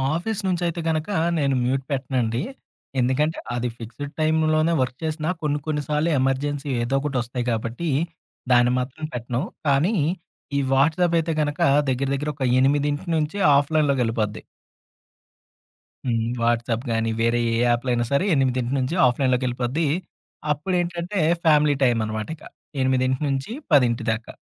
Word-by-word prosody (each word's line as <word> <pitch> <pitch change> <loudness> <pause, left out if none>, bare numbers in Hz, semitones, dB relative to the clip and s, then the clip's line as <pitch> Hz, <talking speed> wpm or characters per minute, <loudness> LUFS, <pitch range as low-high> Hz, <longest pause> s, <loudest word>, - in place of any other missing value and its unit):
Office 205 +5 -2
నుంచి 180 -1 0
అయితే 170 0 -3
గనుక, 160 +3 -1 0.3
నేను 140 -2 +1
మ్యూట్ 130 +2 +1
పెట్టనండి. 125 -4 -1 0.6
ఎందుకంటే 140 +6 +1 0.2
అది 120 0 -1
ఫిక్స్‌డ్ 125 +6 -7
టైమ్‌లోనే 155 +1 +2
వర్క్ 125 0 -2
చేసిన 155 -1 -2 0.2
కొన్ని, 150 -1 0
కొన్ని 150 -2 -1
సార్లు 150 +2 +1
ఎమర్జెన్సీ 140 +2 -1
ఏదో 125 +3 -1
ఒకటి 140 -2 -2
వస్తాయి 120 0 -4
గాబట్టి, 115 +8 -2 0.6
దాన్ని 120 0 +5
మాత్రం 135 +5 -4
పెట్టను. 120 +1 -2 0.3
కానీ, 150 +11 +3 0.6
ఈ - - +3
వాట్సాప్ 165 +6 +3
అయితే 165 0 -1
గనుక 150 0 -2 0.3
దగ్గర, 130 +1 0
దగ్గర 150 +2 -3
ఒక 135 -2 -1
8:00 145 +2 +1
నుంచి 155 +6 -2 0.2
ఆఫ్‌లైన్ 145 +1 +2
లోకి 135 -3 +1
ఎళ్ళిపోద్ది. 110 -2 -2 1.6
హ్మ్. 115 -2 0
వాట్సాప్ 115 +1 0
గాని 115 0 0
వేరే 115 +1 +2
ఏ - - +1
యాప్‌‌లైయినా 120 0 +1
సరే, 140 +7 +2
8:00 130 -2 +1
నుంచి 130 +5 -1
ఆఫ్‌లైన్‌లోకి 130 0 +1
ఎళ్ళిపోద్ది. 125 +6 -1 0.7
అప్పుడేంటంటే, 175 +4 -1 0.2
ఫ్యామిలీ 150 -2 +4
టైం 120 -3 +3
అన్నమాట 110 0 -4
ఇక. - - -20 0.4
8:00 130 0 +1
నుంచి 135 +5 -2 0.2
10:00 125 -5 +4
దాకా. 110 +1 -5
135 Hz, 140 wpm, -23 LUFS, 120-155 Hz, 1.6 s, దాన్ని